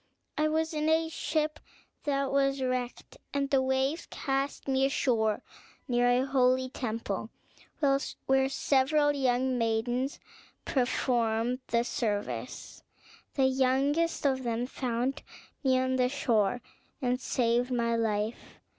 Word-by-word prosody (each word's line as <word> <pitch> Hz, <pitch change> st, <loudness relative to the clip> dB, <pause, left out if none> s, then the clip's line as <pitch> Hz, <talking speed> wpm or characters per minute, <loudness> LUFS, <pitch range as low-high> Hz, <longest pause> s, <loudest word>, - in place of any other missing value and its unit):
I 305 Hz, 0 st, +2 dB
was 320 Hz, +1 st, 0 dB
in 305 Hz, 0 st, 0 dB
a 320 Hz, 0 st, +2 dB
ship 310 Hz, -1 st, -1 dB, 0.5 s
that 275 Hz, -2 st, 0 dB
was 275 Hz, 0 st, +2 dB
wrecked, 255 Hz, -, -3 dB, 0.2 s
and 275 Hz, -1 st, 0 dB
the 270 Hz, -2 st, +4 dB
waves 265 Hz, +4 st, 0 dB
cast 275 Hz, 0 st, -2 dB
me 265 Hz, 0 st, +2 dB
ashore 230 Hz, -6 st, +1 dB, 0.4 s
near 245 Hz, -1 st, +3 dB
a 250 Hz, +2 st, +3 dB
holy 260 Hz, -1 st, +2 dB
temple, 225 Hz, -5 st, -3 dB, 1.0 s
where 265 Hz, 0 st, +3 dB
several 290 Hz, +2 st, +2 dB
young 260 Hz, -2 st, +1 dB
maidens 240 Hz, +4 st, 0 dB, 0.5 s
performed 245 Hz, -2 st, +1 dB
the 235 Hz, 0 st, +2 dB
service. 210 Hz, -4 st, -3 dB, 0.5 s
The 270 Hz, -, +3 dB
youngest 270 Hz, +5 st, +1 dB
of 265 Hz, -2 st, +2 dB
them 235 Hz, -1 st, -1 dB
found 250 Hz, +1 st, -2 dB, 0.4 s
me 260 Hz, -2 st, +3 dB
on 260 Hz, 0 st, +1 dB
the 250 Hz, -1 st, +3 dB
shore, 245 Hz, -4 st, +1 dB, 0.4 s
and 250 Hz, 0 st, 0 dB
saved 240 Hz, 0 st, +1 dB
my 235 Hz, -2 st, +1 dB
life. 220 Hz, 0 st, -2 dB
260 Hz, 120 wpm, -29 LUFS, 240-275 Hz, 1.0 s, the